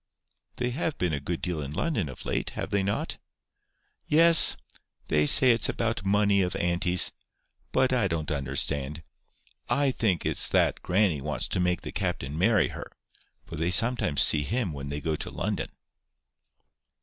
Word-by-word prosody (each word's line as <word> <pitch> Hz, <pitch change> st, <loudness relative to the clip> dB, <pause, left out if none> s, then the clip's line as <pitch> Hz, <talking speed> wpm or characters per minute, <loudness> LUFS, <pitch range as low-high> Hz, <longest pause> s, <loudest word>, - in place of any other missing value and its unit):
"They 125 Hz, 0 st, -3 dB
have 155 Hz, +3 st, -3 dB
been 90 Hz, -3 st, -2 dB
a 70 Hz, -, -2 dB
good 85 Hz, +4 st, -5 dB
deal 85 Hz, -4 st, -3 dB
in 70 Hz, 0 st, -7 dB
London 140 Hz, -, -2 dB
of 65 Hz, -, -11 dB
late, -, -, -2 dB
have -, -, -5 dB
they 100 Hz, -, +1 dB
not?" 100 Hz, +1 st, -3 dB, 0.9 s
"Yes. 165 Hz, +1 st, +8 dB, 0.5 s
They 75 Hz, -1 st, +1 dB
say 130 Hz, -, +6 dB
it's 115 Hz, -, +2 dB
about 115 Hz, -3 st, -3 dB
money 100 Hz, 0 st, +2 dB
of 90 Hz, -1 st, -2 dB
auntie's. 90 Hz, +1 st, +1 dB, 0.6 s
But 130 Hz, 0 st, +1 dB
I 120 Hz, -6 st, +1 dB
don't 80 Hz, -3 st, -4 dB
understand. 70 Hz, +2 st, -2 dB, 0.7 s
I 140 Hz, -1 st, +1 dB
think 100 Hz, -, -1 dB
it's -, -, +1 dB
that -, -, +1 dB
grannie 90 Hz, -6 st, 0 dB
wants 75 Hz, +2 st, -3 dB
to -, -, -2 dB
make 90 Hz, 0 st, 0 dB
the -, -, -7 dB
captain 70 Hz, +2 st, -4 dB
marry 100 Hz, +4 st, +2 dB
her; -, -, -9 dB, 0.5 s
for 85 Hz, -, -9 dB
they 80 Hz, +2 st, -1 dB
sometimes 115 Hz, -, +3 dB
see 75 Hz, -, +4 dB
him 105 Hz, -, -3 dB
when 70 Hz, -1 st, -7 dB
they 70 Hz, +1 st, -5 dB
go 80 Hz, 0 st, -2 dB
to -, -, -5 dB
London." -, -, -4 dB
90 Hz, 165 wpm, -26 LUFS, 75-115 Hz, 0.9 s, Yes